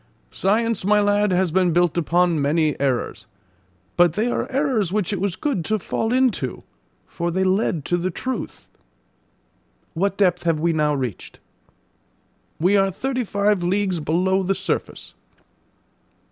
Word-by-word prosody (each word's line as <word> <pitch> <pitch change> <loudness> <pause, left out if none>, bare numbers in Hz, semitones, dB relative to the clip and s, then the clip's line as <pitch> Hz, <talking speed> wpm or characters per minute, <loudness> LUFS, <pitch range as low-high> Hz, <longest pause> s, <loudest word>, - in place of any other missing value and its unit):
"Science, 225 +2 0
my 210 +2 +3
lad, 205 0 +2
has 180 -1 +1
been 180 0 +2
built 175 0 +2
upon 175 -1 +1
many 155 +2 +2
errors; 135 -3 -2 0.7
but 175 -2 +5
they 220 +7 0
are - - -3
errors 260 - 0
which 205 -1 -1
it 190 - -3
was 195 -3 -1
good 220 - -2
to 215 +7 0
fall 225 +3 -2
into, 245 - 0 0.4
for 170 0 -4
they 190 +2 0
led 185 -5 0
to 175 - 0
the 175 +1 -1
truth." 250 +7 -5 1.3
"What 195 +3 -1
depth 180 -3 +2
have 165 -3 0
we 170 +1 +1
now 150 -1 +1
reached?" 125 -8 -5 1.2
"We 185 +5 +3
are 195 0 +3
thirty 255 +6 -2
five 205 -2 +1
leagues 185 0 0
below 180 +5 +1
the 195 +1 0
surface." 190 +2 -4
185 Hz, 145 wpm, -22 LUFS, 170-205 Hz, 1.3 s, but